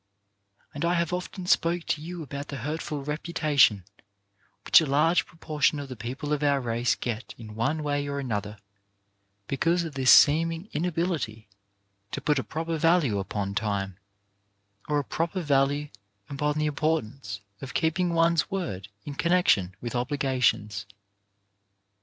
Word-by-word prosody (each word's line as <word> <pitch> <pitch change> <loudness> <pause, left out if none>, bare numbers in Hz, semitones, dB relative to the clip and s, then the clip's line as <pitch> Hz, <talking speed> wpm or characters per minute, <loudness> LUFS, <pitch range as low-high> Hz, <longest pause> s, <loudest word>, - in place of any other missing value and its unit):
I 170 +1 +2
have 170 0 0
often 180 +1 -4
spoken 170 -1 +2
to 150 - 0
you 170 +1 -6
about 140 0 -6
the 145 - -6
hurtful 150 -1 -3
reputation 150 - +2 0.8
which - - +7
a 160 - -1
large 155 +5 +3
proportion 155 -2 0
of 140 -1 -7
the 130 - -6
people 130 +6 -4
of 150 - -1
our 140 -1 +3
race 120 -1 0
get 120 0 -5
in 110 -2 -10
one 150 +8 -1
way 145 -1 -1
or 140 0 -3
another 105 -6 -3 0.9
because 165 - +1
of 160 -3 -6
this 130 -2 +1
seeming 165 +5 +5
inability 160 - -2 0.7
to - - -2
put 150 -2 +1
a - - -2
proper 165 0 -3
value 165 - +3
upon 100 0 -3
time, 100 -3 -2 0.9
or 150 - +2
a 145 - +1
proper 170 +6 -2
value 145 0 +2 0.4
upon 150 +1 -1
the 155 - +1
importance 140 -9 -2 0.2
of 130 -3 -8
keeping 170 +2 +1
one's 165 -1 +2
word 165 - -4 0.2
in 145 - -5
connection 140 - +2
with 120 - -4
obligations. 125 -6 0
145 Hz, 145 wpm, -27 LUFS, 120-165 Hz, 0.9 s, which